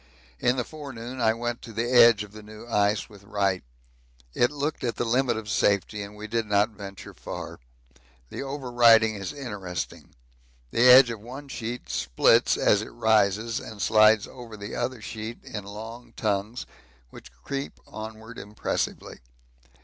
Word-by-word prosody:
In 125 +1 +2
the 125 - -1
forenoon 130 -4 -8
I 110 -1 +3
went 120 0 -3
to 115 - -10
the 115 +2 -2
edge 120 -4 +6
of 105 - -12
the 110 0 -11
new 105 +1 -12
ice 105 -2 +1
with 100 -3 -16
Wright. 100 -2 0 0.7
It 120 - +3
looked 150 +2 -3
at 120 -3 -1
the 120 - -2
limit 120 0 +1
of 110 -1 -6
safety 105 0 +1
and 100 +1 -8
we 105 +1 -8
did 115 0 -2
not 105 +2 +2
venture 100 -1 -10
far. - - -7 0.7
The - - -5
over 135 -2 -5
riding 115 -2 +6
is 95 -3 -5
interesting: 105 - -6 0.6
the 120 +2 +5
edge 125 -1 +9
of 115 - -6
one 130 +6 -10
sheet 120 -1 -5
splits - - +3
as 105 - +3
it 110 - -7
rises 110 0 +2
and 110 -6 -10
slides 110 0 +5
over 120 -4 -10
the 100 +1 -7
other 130 -3 -3
sheet 110 +1 -7
in 105 -2 -7
long 110 +4 -9
tongues 105 +2 -2 0.5
which - - -13
creep 140 0 -5
onward 110 +1 -9
impressively. 105 +1 -4
110 Hz, 165 wpm, -26 LUFS, 105-120 Hz, 0.7 s, edge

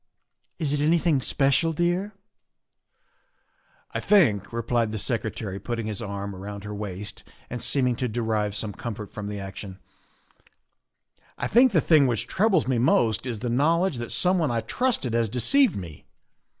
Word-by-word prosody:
" - - -56
Is 145 -3 -1
it 150 - 0
anything 160 -2 +2
special, 140 +5 +1
dear?" 175 +5 -1 0.8
" - - -40
I - - -1
think," 125 - +3
replied 115 -1 0
the 110 - -3
Secretary, 110 -3 -3
putting 115 +2 -4
his 105 -1 -4
arm 100 -2 -5
around 100 +1 -7
her 105 0 -6
waist 105 -1 -6 0.3
and 125 -1 -4
seeming 125 -3 +1
to 125 - -1
derive 110 -3 -1
some 105 0 -3
comfort 105 -3 -7
from 105 -1 -5
the 105 0 -5
action, 95 0 -8 0.8
" - - -53 0.7
I - - -3
think 250 +2 +5
the 165 -6 +3
thing 150 -3 +5
which 120 -4 -1
troubles 200 - +2
me 130 -3 +1
most 120 -1 +2
is 115 -4 -4
the 120 - -2
knowledge 165 +5 +2
that 120 -1 -5
someone 180 -4 +2
I 115 -1 0
trusted 175 - -1
has 115 -2 +1
de 125 - -4
ceived 275 - +4
me. 85 -7 -8
120 Hz, 170 wpm, -25 LUFS, 105-155 Hz, 0.8 s, think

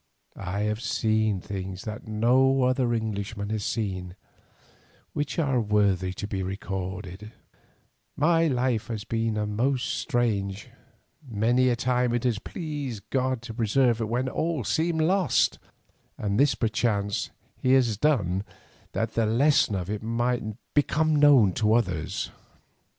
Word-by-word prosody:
I 100 +1 -4
have 105 +1 -1
seen 110 -4 +1
things 95 0 -6
that 110 +1 -7
no 130 +5 +3
other 125 -1 +2
Englishman 105 -2 -3
has 110 -2 -2
seen, 95 -6 -3 1.0
which 145 0 -3
are 135 -7 +2
worthy 100 -4 +1
to 105 - -5
be 100 -2 -3
recorded; 95 +1 -5 0.8
my 165 +2 +3
life 125 -5 0
has 110 -4 -4
been 115 -1 -1 0.2
most 125 +3 +1
strange, 105 -5 -1 0.6
many 120 +4 +2
a 120 - +2
time 125 0 +1
it 120 - -1
has 120 -5 +1
pleased 140 - -6
God 130 -2 0
to 115 -2 -7
preserve 120 +1 +2
it 110 - -2
when 125 +3 0
all 155 -1 -1
seemed 160 +6 0
lost, 180 -2 +2 0.6
and 100 0 -1
this 140 0 +4
perchance 105 -3 0 0.3
He 130 - +3
has 125 -5 +3
done 100 - +1 0.5
that 110 0 -1
the 115 -2 +1
lesson 125 -1 +3
of 90 -2 -3
it 105 +1 -3
might 120 +2 0 0.3
become 155 +2 +2
known 140 -10 +6
to 110 +2 +2
others. 90 -10 -1
115 Hz, 135 wpm, -26 LUFS, 100-130 Hz, 1.0 s, known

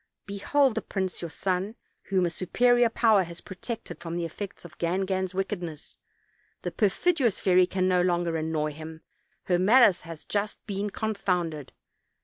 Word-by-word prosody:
Behold 240 +7 +2
the 225 - -2
prince 190 -2 -3
your 170 - -4
son, 190 +5 -2 0.3
whom 190 -2 +2
a 170 - -1
superior 240 +7 +3
power 220 -3 +4
has 170 -1 -5
protected 215 +4 -7
from 165 0 -5
the 170 - -1
effects 190 +3 -7
of 155 -4 -13
Gangan's 185 +1 -1
wicked 195 0 -2
ness; 160 -3 -8 0.7
the - - -2
perfidious 235 - +2
fairy 185 -1 +4
can 185 0 0
no 180 -1 +3
longer 175 -2 +1
annoy 155 -1 -1
him, 160 +1 -9 0.4
her 180 -1 +1
malice 210 0 +6
has 165 -2 -10
just 205 0 -2
been 205 0 -2
confounded. 180 - -2
185 Hz, 155 wpm, -27 LUFS, 170-205 Hz, 0.7 s, malice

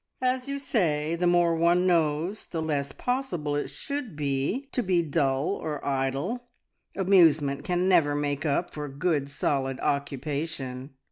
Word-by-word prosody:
"As 255 +1 +1
you 280 0 -2
say, 165 - 0
the 175 +1 +1
more 175 -1 +4
one 170 +2 +3
knows, 170 +3 +1
the 165 - -4
less 145 -3 -1
possible 180 - -2
it 145 - -2
should 280 - -5
be 145 - -1
to 250 - 0
be 180 -5 +2
dull 140 -2 +1
or 150 -2 -4
idle. 140 - -2 0.5
Amusement 160 -7 +4
can 180 +2 0
never 165 -6 +4
make 145 -1 -1
up 160 +4 0
for 150 -1 -5
good 140 0 0
solid 135 -2 -1
occupation." 140 -1 -3
155 Hz, 145 wpm, -27 LUFS, 140-180 Hz, 0.5 s, more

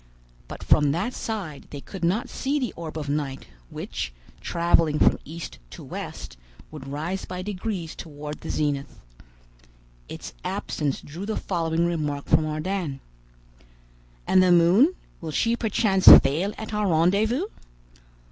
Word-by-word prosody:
But - - -8
from 145 -2 +4
that 195 +10 -2
side 190 -11 -5
they 145 - -7
could 185 +5 -9
not 210 +10 +1
see 280 +2 -2
the 250 - -2
orb 160 -1 -6
of 150 -2 -4
night, 140 -2 -2 0.2
which, - - -5 0.3
traveling 165 -3 +2
from - - +4
east 165 +2 -8
to - - -10
west, - - -7 0.3
would 150 -3 -9
rise 160 +7 -3
by 180 0 -5
degrees 190 -4 -4
toward 150 -1 -8
the - - -7
zenith. 145 -2 -2 1.1
Its - - -8
absence 145 -3 -2
drew 170 +7 -8
the 220 - -2
following 165 -2 0
remark 150 -4 -2
from 155 - +3
Ardan: 155 -2 -3 1.3
"And 185 - +5
the 185 -1 +4
moon; 185 - +5 0.3
will 165 - -5
she 230 +9 +1
perchance 210 -4 +1
fail 160 +9 +8
at 220 0 -7
our 210 -1 +1
rendezvous?" 200 - +2
170 Hz, 140 wpm, -25 LUFS, 150-200 Hz, 1.3 s, fail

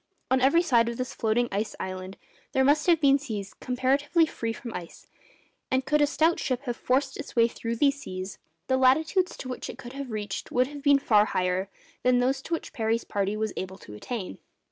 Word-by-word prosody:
On 260 0 +4
every 330 +7 +5
side 235 -7 +3
of 235 - -5
this 255 -1 -3
floating 230 +2 +1
ice 205 +2 -2
island 185 0 -5 0.4
there 265 -1 +3
must 290 +4 +3
have 340 -2 +5
been 280 -2 +5
seas 210 -8 -5
comparatively 275 +6 +1
free 230 -7 -4
from 230 0 -7
ice; 175 -2 -8 0.6
and 260 0 +1
could 300 +2 +2
a 290 - +5
stout 320 +3 +2
ship 255 0 -2
have 245 -3 -3
forced 265 +2 0
its 290 - -8
way 230 -1 +5
through 230 0 -4
these 280 +3 +2
seas, 185 -2 -6 0.3
the 260 +5 +2
latitudes 315 +8 +3
to - - -7
which 255 - -5
it - - -7
could 240 +1 -9
have 275 -1 -6
reached 210 -3 -4
would 250 +1 +3
have 290 +2 -9
been 285 0 +5
far 215 -6 +4
higher 185 -1 -1 0.3
than 250 0 +4
those 260 +2 +1
to 335 - -5
which - - -8
Parry's 225 0 0
party 200 +1 -1
was 220 0 -2
able 190 0 -5
to 105 - -12
attain. 185 - -5
250 Hz, 210 wpm, -27 LUFS, 215-280 Hz, 0.6 s, every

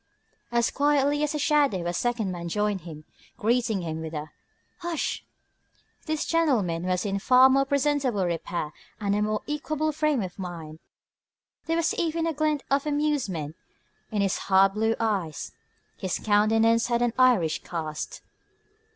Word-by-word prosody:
As 235 -1 +2
quietly 290 0 +2
as 300 0 0
a - - +1
shadow 285 - +2
a 175 - -1
second 230 -1 -1
man 170 -1 -5
joined 210 0 0
him, 155 -2 -10 0.3
greeting 230 -4 +1
him 160 -1 -4
with 160 0 -6
a 150 0 -5 0.5
"Hush!" 340 -3 -2 0.8
This 310 -1 -1
gentleman 215 - +1
was 180 +2 0
in 200 -1 -1
far 255 +5 +6
more 275 +1 +3
presentable 275 -7 +1
repair 170 -2 -3 0.3
and 200 -1 0
a 210 - +1
more 215 0 -1
equable 310 +1 -1
frame 300 -5 +1
of 185 +1 -8
mind. 165 -4 -7 0.9
There 330 +1 +1
was 335 -1 +1
even 330 -1 -1
a 330 - 0
glint 305 -1 0
of 280 +2 +2
amusement 270 - -1 0.5
in 210 -3 0
his 195 - 0
hard 195 0 +5
blue 220 +2 +1
eyes. 195 - -2 0.5
His 190 -2 -2
countenance 225 +2 +3
had 240 0 +1
an 240 -2 +1
Irish 235 -12 +4
cast. 155 -3 -5
225 Hz, 150 wpm, -26 LUFS, 180-285 Hz, 0.9 s, far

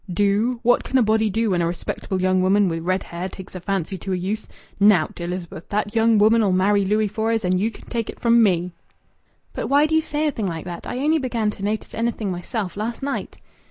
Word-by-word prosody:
"Do? 205 +6 +1
What 245 +1 +3
can 265 - 0
a 255 - +5
body 220 0 +2
do 220 +1 0
when 175 -2 +1
a 170 - +1
respectable 180 +2 -3
young 185 0 +2
woman 195 +2 +3
wi' 165 -1 -2
red 185 +3 -1
hair 175 +2 -5
takes 190 0 -11
a 185 - -6
fancy 190 0 -3
to 190 +2 -3
a - - +1
youth? 195 +5 -3 0.3
Nowt, 200 -5 +3
Elizabeth. 175 -1 -6
That 205 0 -1
young 225 0 +4
woman'll 215 -1 +4
marry 200 +2 +3
Louis 210 +2 +1
Fores, 220 +1 -1
and 180 0 +2
ye 215 +4 +1
can - - -14
take 230 -3 -3
it - - -8
from 235 0 +4
me." 180 -4 +2 0.8
"But - - -3
why 285 +2 +4
do 315 - -2
you 320 - +4
say 300 0 -2
a 300 - +2
thing 220 -6 -3
like 165 -2 -5
that? 175 -1 -7
I 245 - -4
only 305 +4 +2
began 235 -5 -1
to 200 - -10
notice 215 +2 -2
anything 225 -3 -2
myself 180 +2 -4
last 225 +5 -4
night." 280 0 -4
205 Hz, 230 wpm, -22 LUFS, 185-230 Hz, 0.8 s, a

